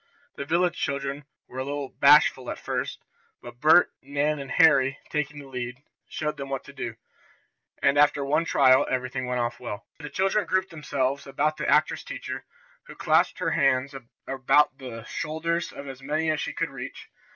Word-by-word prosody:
The 140 - -5
village 175 +3 +1
children 140 0 -3 0.2
were 130 - -8
a - - -1
little 140 0 -4
bashful - - +5
at - - -4
first, - - -4 0.4
but 120 0 -12
Bert, 160 +4 +6
Nan 145 +2 -1
and 135 -1 -7
Harry, 140 -4 +4
taking 150 0 -2
the 145 -1 -9
lead, 125 0 -6 0.3
showed 150 -1 -3
them 140 -1 -6
what 135 -1 -3
to 140 - -13
do, 120 -4 -5 0.9
and 140 +1 +4
after 145 -1 +4
one 150 +4 +2
trial 130 -5 +4
everything 130 0 -2
went 125 -1 -1
off 120 0 -3
well. 105 -4 -6
The 150 -2 -7
children 195 +2 0
grouped 185 +2 0
themselves 140 -3 -2
about 150 +3 0
the - - -2
actress - - +2
teacher, - - -6 0.4
who - - -11
clasped - - +2
her - - -1
arms 130 +2 +2 0.3
about 135 +1 +2
the 120 -4 -8
shoulders 165 +6 -2
of 140 - -9
as 135 -1 -8
many 155 +3 0
as 155 - -1
she - - -3
could - - -2
reach. - - -8
140 Hz, 180 wpm, -26 LUFS, 130-150 Hz, 0.9 s, Bert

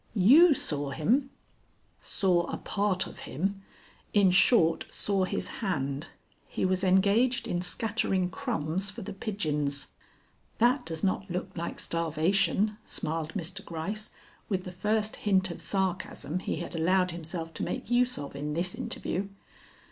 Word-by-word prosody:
"You 280 - +7
saw 145 - -1
him?" 240 - +1 0.7
"Saw 180 -3 +2
a - - -3
part 200 -2 0
of - - -10
him; 195 +7 -2 0.5
in 200 -3 +6
short, 180 -3 +4
saw 195 -2 0
his - - -2
hand. 145 -6 -1 0.4
He - - -2
was 185 0 +1
engaged 200 +7 +3
in 175 - -1
scattering 190 -1 0
crumbs 195 - -1
for 205 +3 -6
the 205 +1 -6
pigeons." 150 - -1 0.7
"That 245 +3 +3
does 160 -1 -4
not 195 0 0
look 180 +1 -4
like 170 -1 -4
starvation," 175 +6 +1
smiled 160 0 -3
Mr. 180 -2 -4
Gryce, 195 +6 -4 0.4
with 190 -3 0
the 180 - -6
first 210 +4 0
hint 190 -3 +2
of - - -4
sarcasm 185 -4 -2
he - - -2
had - - -5
allowed 180 +2 +2
himself 165 0 -6
to - - -4
make 230 - -4
use 250 +1 +3
of 140 -1 -6
in 150 +1 -3
this 180 +2 0
interview. 195 +2 -2
185 Hz, 145 wpm, -29 LUFS, 165-205 Hz, 0.7 s, You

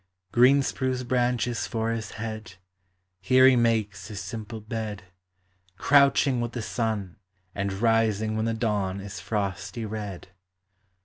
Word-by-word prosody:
Green 130 +5 +5
spruce 130 -1 -2
branches 120 -2 0
for 115 0 -1
his 115 -1 -4
head, 110 -3 -6 0.6
Here 130 +8 +5
he 130 - +6
makes 110 -5 0
his 105 -2 -6
simple 110 +3 -6
bed, 110 -3 -5 0.7
Crouching 140 -1 +4
with 120 0 -3
the 120 - -4
sun, 105 -2 -2 0.4
and 100 0 -2
rising 110 0 +1
When 110 0 0
the 115 0 0
dawn 105 -4 -1
is 100 0 -7
frosty 100 +1 -3
red. 105 -4 -6
110 Hz, 130 wpm, -26 LUFS, 100-120 Hz, 0.7 s, he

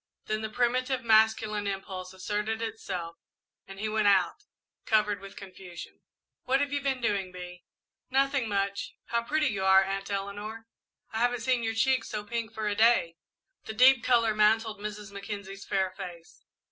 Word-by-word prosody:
Then 215 0 -2
the 220 - -3
primitive 255 +3 0
masculine 220 -2 +3
impulse 190 -2 -5
asserted 210 +4 -2
itself 190 -7 -5 0.5
and 195 0 -10
he 215 - -1
went 215 -1 +1
out, 195 - +3 0.4
covered 210 -2 +2
with 195 0 -10
confusion. 185 -3 -10 0.5
"What 265 +1 +3
have 285 0 -1
you 285 - 0
been 265 -2 -1
doing, 200 -5 0
Bee?" 180 -1 -9 0.4
"Nothing 270 -2 +1
much. 200 0 -2
How 235 0 +1
pretty 300 +4 +1
you 200 -4 -2
are, 190 0 +6
Aunt 195 +1 -4
Eleanor! 205 +3 -4 0.5
I 220 - -3
haven't 245 0 +1
seen 250 +1 +1
your 225 -1 -2
cheeks 260 +2 +2
so 210 -1 -3
pink 230 +1 -4
for 220 -1 -6
many 210 -1 +1
a - - -8
day." 220 -8 +4 0.5
The 220 - -5
deep 255 +1 +6
colour 230 -3 +3
mantled 215 0 +2
Mrs. 210 -1 -6
Mackenzie's 200 -1 -7
fair 190 -2 0
face. 180 -3 -10
215 Hz, 170 wpm, -29 LUFS, 195-230 Hz, 0.5 s, are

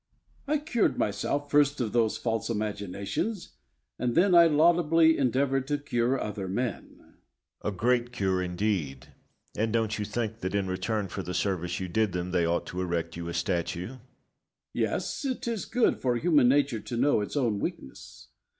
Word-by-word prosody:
I 305 +2 +2
cured 285 -7 0
myself 140 +7 -1
first 145 0 +3
of 115 -4 -1
those 115 -2 +2
false 115 -2 -2
imaginations, 105 - -3 0.5
and 120 -1 -1
then 185 +2 +4
I 170 -1 +8
laudably 165 +1 +4
endeavoured 135 +1 +1
to 145 0 0
cure 130 -2 0
other 105 -2 -4
men. 120 +6 -3
Locke. - - -24 0.6
A - - -12
great 120 +3 +1
cure, 95 -5 0
indeed! 90 -7 -2 0.5
and 110 +1 0
don't 115 -1 0
you 105 - -1
think 110 +1 -3
that, 95 0 -3
in 100 -1 +1
return 95 +3 -2
for 95 - -5
the 90 -1 -5
service 90 -1 -1
you 95 - -3
did 105 +1 0
them, 90 0 -3
they 90 -2 +2
ought 85 +1 0
to 90 - -4
erect 85 -2 -2
you 85 0 -5
a - - -4
statue? 90 -1 -2
Bayle. 130 -1 -12 0.7
Yes; - - -2
it 260 -3 -3
is 230 -4 -2
good 245 0 +1
for 125 -2 +1
human 145 -2 +4
nature 135 -4 +2
to 120 +3 -5
know 130 -3 +3
its 105 - -4
own 115 -7 +1
weakness. 60 -5 -7
115 Hz, 175 wpm, -28 LUFS, 95-140 Hz, 0.7 s, I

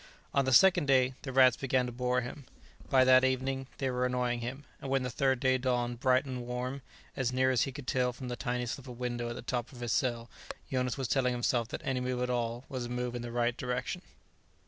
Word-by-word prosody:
On 140 -1 +3
the 130 - +1
second 175 +3 +6
day, 130 -1 +4
the 135 - -5
rats 130 -2 +6
began 130 -1 +1
to 125 - -4
bore 125 +1 0
him. 125 +3 -8 0.4
By 130 -2 +5
that 130 0 +6
evening, 130 0 0
they 135 -2 -1
were 125 0 -1
annoying 125 -1 0
him, 125 +4 -5 0.2
and 135 - -5
when 135 -1 +1
the 125 - -3
third 130 0 +1
day 130 -1 +2
dawned 120 -2 -1
bright 130 0 +3
and 130 -2 -4
warm 125 +2 -3 0.3
as 130 -3 0
near 130 +1 +2
as 130 - +2
he 135 - -4
could 140 0 -9
tell 125 0 +1
from 125 +1 -8
the 125 - -3
tiny 125 -1 -2
slip 130 +3 -5
of 125 -2 -8
window 120 -1 -3
at 120 - -5
the - - -7
top 120 +1 -3
of 125 -3 -11
his 120 -1 -2
cell 120 -3 0 0.4
Jonas 125 -1 0
was 135 -2 -2
telling 125 -1 +2
himself 120 -1 0
that - - -6
any 130 -1 -1
move 125 0 -1
at 125 - -1
all 120 +1 -2
was 130 -2 -4
a - - -6
move 125 0 -2
in 120 - -4
the 120 0 -6
right 120 0 +1
direction. 125 +8 -3
125 Hz, 245 wpm, -31 LUFS, 120-130 Hz, 0.4 s, second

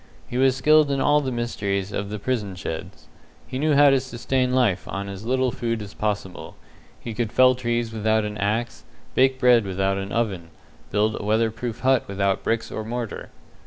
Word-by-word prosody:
He 125 - -3
was 130 -1 +4
skilled 155 +1 +4
in 140 -1 0
all 145 +2 +3
the 130 -2 -3
mysteries 100 -5 -2
of 100 0 -3
the 105 - -4
prison 105 -4 -2
sheds. 80 -7 -7 0.4
He 130 - -5
knew 150 0 +2
how 145 0 +7
to 135 - +4
sustain 130 0 -1
life 120 -8 +1
on 100 0 -4
as 100 +3 -7
little 130 0 +1
food 115 -1 -2
as 100 - -10
possible. 105 -3 -4 0.4
He 115 - -6
could 115 -1 -2
fell 130 0 +5
trees 120 -2 -2
without 110 0 +1
an 105 0 -4
axe, 110 +4 -2 0.3
bake 130 0 +3
bread 125 -3 +5
without 95 0 -1
an 100 +1 -5
oven, 95 -8 -2 0.4
build 105 +1 +1
a - - -6
weatherproof 110 +2 -1
hut 130 -1 +3
without 100 0 0
bricks 115 0 -1
or 110 - -4
mortar. 115 0 -5
115 Hz, 190 wpm, -23 LUFS, 100-130 Hz, 0.4 s, how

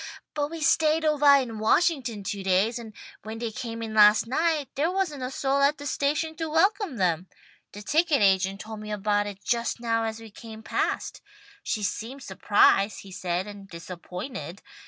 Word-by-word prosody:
But 290 -1 -1
we 330 0 -7
stayed 315 0 +3
ovah 295 -2 +6
in 225 -3 -7
Washington 240 - +1
two 200 +1 -4
days, 195 +5 +1
and 225 -2 -9 0.3
when 220 +1 -7
they 230 -1 -4
came 230 +1 -6
in 220 -1 -5
last 210 0 +6
night 305 +3 0
there 300 +4 0
wasn't 360 -7 -2
a 255 - -3
soul 270 +1 0
at 285 +2 +3
the 285 - -9
station 300 +3 -1
to 325 -1 -3
welcome 380 - +1
them. 180 -2 0 0.5
The 205 - -9
ticket 305 +3 +2
agent 195 0 +2
told 220 0 -8
me 215 0 -7
about 205 0 0
it 200 -1 -9
just 235 0 -1
now 230 -1 0
as 220 0 -4
we 225 -1 -12
came 220 0 -11
past. - - -2 0.4
She 215 - -3
seemed 235 +6 -4
surprised, 200 +1 +3
he 195 - -13
said, 180 0 -2
and 200 -2 -11
disappointed. 180 +4 -8
225 Hz, 180 wpm, -26 LUFS, 205-290 Hz, 0.5 s, ovah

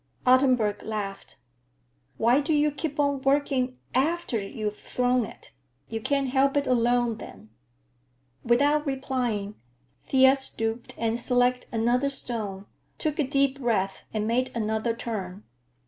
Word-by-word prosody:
Ottenburg 250 -5 +3
laughed. 200 -6 -5 0.8
"Why 240 +4 +4
do 305 +2 0
you 295 0 +3
keep 295 0 -5
on 285 -2 +1
working 270 -2 +1 0.2
after 300 -2 +1
you've 210 +1 -4
thrown 250 -1 0
it? - - -13 0.4
You 225 -1 -4
can't 275 +2 0
help 275 +2 +2
it 285 - +1
along 240 -2 +2
then." 105 - -12 0.9
Without 285 +5 +3
replying, 250 -7 -2 0.5
Thea 265 0 +6
stooped 225 -3 -3
and 230 0 0
selected 250 +1 +1
another 240 +4 +1
stone, 215 -7 -4 0.3
took 305 -2 -2
a - - +4
deep 275 0 +1
breath 210 -6 -1
and 215 -1 -2
made 245 +3 +1
another 220 +1 -1
turn. 205 -4 -5
245 Hz, 130 wpm, -26 LUFS, 220-275 Hz, 0.9 s, Thea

